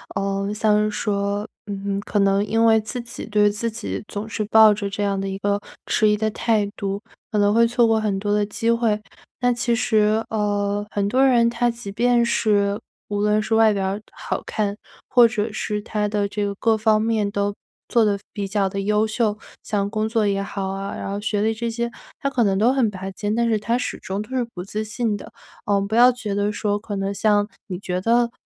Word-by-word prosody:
呃， 195 0 -1
像 210 -1 +2
是 215 - +1
说， 205 0 -1 0.2
嗯， 200 0 -3
可 205 - -1
能 195 0 +3
因 225 +1 +2
为 220 -1 +5
自 215 +4 -5
己 235 0 -8
对 210 -1 +3
自 230 +3 -2
己 225 -1 -5
总 205 +1 -5
是 215 0 -3
抱 220 0 +7
着 200 -1 -3
这 200 +1 -3
样 200 -1 0
的 195 0 -3
一 195 - -4
个 200 +1 0 0.2
迟 215 - +3
疑 210 - +2
的 220 +1 0
态 220 -1 +1
度， 200 0 -3 0.3
可 215 - 0
能 205 0 +3
会 230 +1 +5
错 240 0 +3
过 225 -1 +2
很 205 -3 0
多 205 +1 -1
的 210 0 +2
机 230 +2 0
会。 230 -3 +1 0.4
那 245 0 +3
其 240 0 0
实， 220 -1 +2
呃， 205 -1 0
很 200 -1 -1
多 255 +6 +3
人 245 -3 +5
他 240 0 +1
即 235 -4 -6
便 240 +3 +3
是 205 -3 +1 0.3
无 205 0 -1
论 210 0 +3
是 215 +1 -2
外 220 -1 +5
表 195 0 -1
好 - - -4
看， 205 -2 -1 0.3
或 245 -2 +6
者 220 -1 -2
是 210 -1 -2
他 210 -1 -1
的 205 -1 0
这 205 +1 -3
个 200 0 -3
各 225 +1 +2
方 215 0 +3
面 220 -2 +1
都 200 0 -1 0.3
做 235 - +3
得 205 -2 +2 0.2
比 200 -2 -3
较 200 0 +1
地 195 +1 -3
优 210 +2 +2
秀， 215 -1 0 0.2
像 200 -2 -1
工 215 0 -1
作 225 -1 +1
也 195 0 0
好 195 -1 -4
啊， 195 +1 -4
然 - - -5
后 200 - -3
学 210 -1 -1
历 220 +1 +2
这 235 +1 -3
些 235 +1 -2 0.3
他 275 - -1
可 255 -4 +1
能 195 -2 +2
都 230 +6 +4
很 255 -5 +2
拔 190 -1 -6
尖， 205 +2 -2
但 235 0 +2
是 220 -2 +1
他 230 +3 0
始 250 - -4
终 195 +1 -4
都 215 - -17
是 255 - +1
不 180 - -5
自 210 +3 -4
信 215 0 -1
的。 205 - -9 0.4
嗯， 200 -1 +2
不 215 - -6
要 245 +2 +7
觉 240 -5 -5
得 205 +1 0
说 205 -1 -1
可 205 -1 -6
能 195 0 -2
像 205 0 +2 0.2
你 185 -4 -4
觉 180 -1 -3
得， 235 +3 +2
210 Hz, 245 characters per minute, -22 LUFS, 200-225 Hz, 0.4 s, 抱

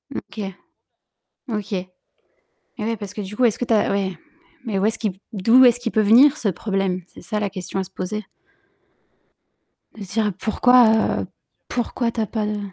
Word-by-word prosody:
OK. 215 - -6 1.1
OK. 210 -2 -3
Eh 185 0 -4 0.9
oui, 225 +2 -1
parce 205 -1 -8
que 210 - -5
du 200 +2 -7
coup, 250 - +3
est-ce 220 - +1
que 245 - -1
tu 230 - +1
as 210 - +2
ouais, 190 -3 -1 0.5
mais 200 -4 -1
où 200 - +1
est-ce 220 - 0
qui 195 -4 -3
d'où 230 +6 +6
est-ce 245 0 +5
qu'il 235 -2 -3
peut 220 - +2
venir 260 +8 +6
ce 210 - 0
problème? 190 0 -1
C'est - - -15
ça 215 -2 -3
la 205 -1 -1
question 190 0 -5
à - - 0
se 190 - -13
poser. 210 +4 -4 1.7
De 205 - -7
se 190 - -10
dire: 215 -2 +1
«Pourquoi, 240 0 +5 0.3
heu, - - -6 0.4
pourquoi 240 0 -2
tu 225 - -3
as 215 - -1
pas 215 0 -2
de» 210 0 -2
210 Hz, 195 wpm, -22 LUFS, 195-230 Hz, 1.7 s, d'où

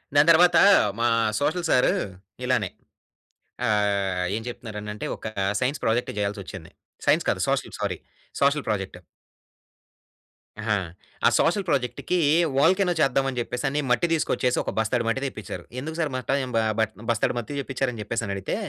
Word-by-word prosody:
దాని 145 +2 +6
తర్వాత 170 +1 +6 0.4
మా 120 - +3 0.3
సోషల్ 170 +3 0
సారు 125 - +4 0.5
ఇలానే 125 -6 +1 1.0
ఆహ్, 100 -4 +1
ఏం 110 - -4
జెప్తున్నారనంటే 105 -3 -6
ఒక - - -9 0.3
సైన్స్ 135 +3 -1
ప్రాజెక్ట్ 115 +2 +1
జేయాల్సొచ్చింది. 100 -4 -4 0.4
సైన్స్ - - +3
కాదు - - -1
సోషల్ - - -1
సారీ - - -2 0.4
సోషల్ 140 +1 +3
ప్రాజెక్టు. 95 -4 -2 1.6
ఆహా! 105 -1 +1 0.5
ఆ - - +7
సోషల్ 195 +3 +2
ప్రాజెక్ట్‌కి 140 +5 0 0.4
వోల్కానో 185 +5 +4
చేద్దావని 135 -2 +1
జెప్పేసని 135 +4 -2
మట్టి 125 +8 +3
దీసుకొచ్చేసి 130 -5 +1
ఒక - - -3
బస్తాడు 115 +2 +1
మట్టి 115 +4 0
దెప్పించారు. 105 -8 -6 0.2
ఎందుకు 160 +4 -5
సారు 155 -3 +1
బట్టా 130 -2 -1
యం 130 - -5
బ 115 - +4 0.2
బట్ 110 0 +1 0.2
బస్తాడు 115 -2 +1
మట్టి 120 +5 -4
చెప్పిచ్చారని 135 -3 -2
జెప్పేసని 105 -1 -3
అడిగితే, 95 - -3
125 Hz, 140 wpm, -25 LUFS, 105-140 Hz, 1.6 s, ఆ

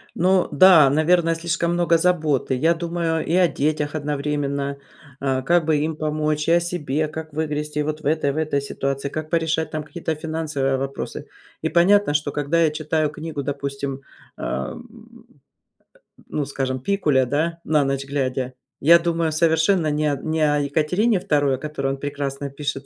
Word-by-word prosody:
Ну, 185 +1 +2
да, 175 -7 +7
наверное, 165 +3 +3
слишком 170 +1 -1
много 175 -1 +3
заботы. 160 -6 +1
Я 160 +6 +2
думаю 165 -1 -2
и 165 - -1
о 180 0 +5
детях 150 0 -1
одновременно, 140 -1 -2 0.4
а, 135 -1 0
как 170 +3 +2
бы 155 -1 +2
им 155 +2 -1
помочь, 155 0 -1
и - - +5
о 170 - +5
себе, 155 -4 -2
как 155 0 -7
выгрести 150 0 -2
вот 155 +1 -3
в 155 - -11
этой, 150 -2 +1
в - - -7
этой 155 -2 0
ситуации, 140 0 -3
как 155 +2 -5
порешать 160 -2 0
там 155 -1 -4
какие-то 160 +2 -4
финансовые 155 -4 -2
вопросы. 135 +1 -5 0.3
И - - +1
понятно, 180 0 +4
что 145 -1 0
когда 150 +3 0
я 160 -2 +4
читаю 155 0 -1
книгу, 150 -1 -5
допустим, 140 -1 -4 0.4
ам, 65 - -4 1.4
ну, 145 -2 -2
скажем, 130 -2 -3
Пикуля, 150 -6 +1
да, 160 +6 -1
на 150 -2 +2
ночь 135 0 -2
глядя, 130 -2 -2 0.3
я 170 +4 +7
думаю 165 -1 0
совершенно 160 +2 +2
не 150 +1 0
о 140 - -1
не 160 0 -2
о 150 -1 +3
Екатерине 160 +10 +1
II, 145 -5 +1
о - - -7
которой 150 -1 -4
он 135 - -5
прекрасно 140 0 -4
пишет, 140 0 -4
150 Hz, 170 wpm, -22 LUFS, 140-165 Hz, 1.4 s, да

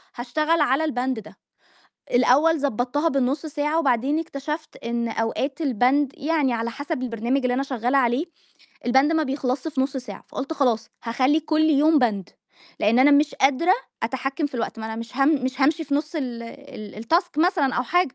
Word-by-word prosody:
هاشتغل 305 +7 0
على 285 +1 +2
البند 260 -5 -1
ده، 210 - -13 0.7
الأول 280 +6 +4
ضبّطتها 275 +3 0
بالنُص 275 +2 0
ساعة 300 +2 -1
وبعدين 275 +1 +1
اكتشفت 305 0 -5
إن 235 0 -2
أوقات 260 +7 -2
البند 270 +1 +2
يعني 295 -4 +1
على 230 0 -2
حسب 285 +3 -4
البرنامج 240 +3 -1
اللي 250 -1 0
أنا 270 +2 0
شغّالة 255 0 0
عليه، 250 +4 +2 0.6
البند 265 +5 +4
ما 320 -1 +2
بيخلصش 265 0 -2
في 290 -4 -2
نُص 270 +1 -1
ساعة، 255 -1 -8
فقُلت 275 +4 -5
خلاص 245 -7 +1 0.2
هاخلّي 255 +6 +2
كلّ 315 0 +2
يوم 305 +2 +4
Band، 205 -5 -1 0.6
لإن 220 +4 +3
أنا 270 +3 +6
مش 290 +1 +3
قادرة 285 +7 +3 0.3
أتحكّم 270 +5 -2
في 280 - -12
الوقت، 235 0 -3
ما 220 - -5
أنا 220 - -5
مش 230 +2 -8
هام 275 +1 +4 0.2
مش 260 +1 -3
هامشي 305 +4 +2
في 280 -1 -2
نُص 300 +3 -2
ال 245 -5 -4
ال 230 -4 -10
الTask 335 - +1
مثلًا 320 -6 +2
أو 245 - +1
حاجة، 350 +1 +1
270 Hz, 180 wpm, -23 LUFS, 245-300 Hz, 0.7 s, أنا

